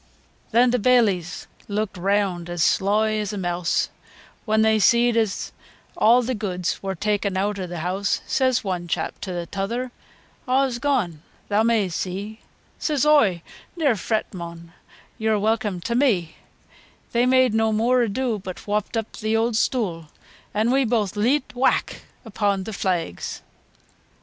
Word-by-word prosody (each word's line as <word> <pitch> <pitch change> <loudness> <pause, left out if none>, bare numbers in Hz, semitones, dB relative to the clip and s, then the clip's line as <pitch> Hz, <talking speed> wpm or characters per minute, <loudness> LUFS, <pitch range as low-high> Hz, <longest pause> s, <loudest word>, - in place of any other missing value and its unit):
V. - - -34 0.5
Then 240 +2 +5
t' 250 - +1
baileys 205 -8 +2 0.2
leuked 210 0 -2
reawnd 185 -2 0
as 175 -2 0
sloy 215 +4 +2
as 210 0 -3
a - - -4
meawse, 175 -2 0 0.6
When 220 -1 +3
they 220 0 +3
seed 235 +2 +4
as 220 -4 0 0.4
aw 240 +3 +5
t' 255 +2 -1
goods 185 -5 -3
were 195 -1 -3
ta'en 205 0 -1
eawt 200 +1 -1
o' 185 - -3
t' 175 - -7
heawse, 185 +4 -1
Says 260 -2 +1
one 180 -3 -3
chap - - -3
to 195 - -5 0.2
th' - - -24
tother, 235 +6 -3 0.6
"Aws 260 -1 +1
gone, 220 - 0 0.3
theaw 210 +2 +3
may 225 -4 +2
see;" 195 +5 -4 0.4
Says 300 -2 0
oi, 215 - +4 0.3
"Ne'er 290 -8 +3
freet, 215 +2 -2
mon, 170 -2 -8 0.5
yeaur 220 -1 +2
welcome 210 -3 0
ta' 185 +7 -3
me." 220 - +1 0.8
They 240 +1 +2
made 255 -2 +4
no 220 0 +2
moor 240 +4 +3
ado 235 0 -1
But 185 -1 -8
whopped 210 +2 -1
up 225 -1 -3
th' - - -11
eawd 225 +2 +1
stoo', 195 -9 0 0.4
An' 220 +3 +1
we 270 +1 +3
booath 220 -5 0
leet, 255 +7 +1
whack 260 +2 0 0.2
upo' 205 -2 0
t' 220 - -6
flags! 180 - -3
215 Hz, 155 wpm, -23 LUFS, 190-235 Hz, 0.8 s, Then